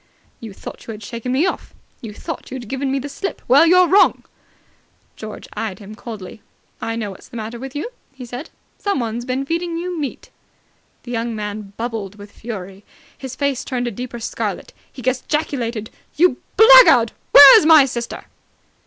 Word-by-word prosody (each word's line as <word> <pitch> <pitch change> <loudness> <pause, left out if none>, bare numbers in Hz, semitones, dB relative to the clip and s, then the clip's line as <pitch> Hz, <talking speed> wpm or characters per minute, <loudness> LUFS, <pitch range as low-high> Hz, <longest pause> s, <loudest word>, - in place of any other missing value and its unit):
"You 225 -2 -9
thought 195 - -11
you 225 - -5
had 210 0 -11
shaken 235 +3 -5
me 275 +7 +2
off! 370 - -4 0.3
You 225 - -7
thought 320 +10 -7
you'd 255 -3 -7
given 265 +3 -3
me 275 - 0
the 270 +1 -4
slip! 390 +7 -5
Well, 285 +7 +6
you're 365 +1 +5
wrong!" 390 +3 +4 0.9
George 215 -1 -9
eyed 210 -3 -4
him 205 0 -11
coldly. 215 -2 -9 0.4
"I 225 - -3
know 215 -3 -4
what's 190 - -14
the 235 - -10
matter 225 +2 -6
with 270 +2 -8
you," 315 +12 -4 0.2
he 265 -2 -10
said. 245 +6 -8 0.3
"Someone's 240 - -2
been 260 +2 -2
feeding 335 +2 -2
you 350 0 -4
meat." 280 -4 -6 0.7
The 245 - -9
young 230 -1 -2
man 210 -1 -6
bubbled 225 -4 -5
with 205 0 -13
fury. 195 -4 -8 0.3
His 260 -1 -8
face 280 -2 -1
turned 245 -2 -3
a 240 - -2
deeper 245 -1 -7
scarlet. 225 - -4 0.2
He 255 - -11
gesticulated. 250 -4 -2 0.2
"You 340 -5 +3 0.2
blackguard! 445 - +8 0.2
Where's 285 +2 +10
my 310 -4 +8
sister?" 235 -2 -6
245 Hz, 170 wpm, -19 LUFS, 220-285 Hz, 0.9 s, Where's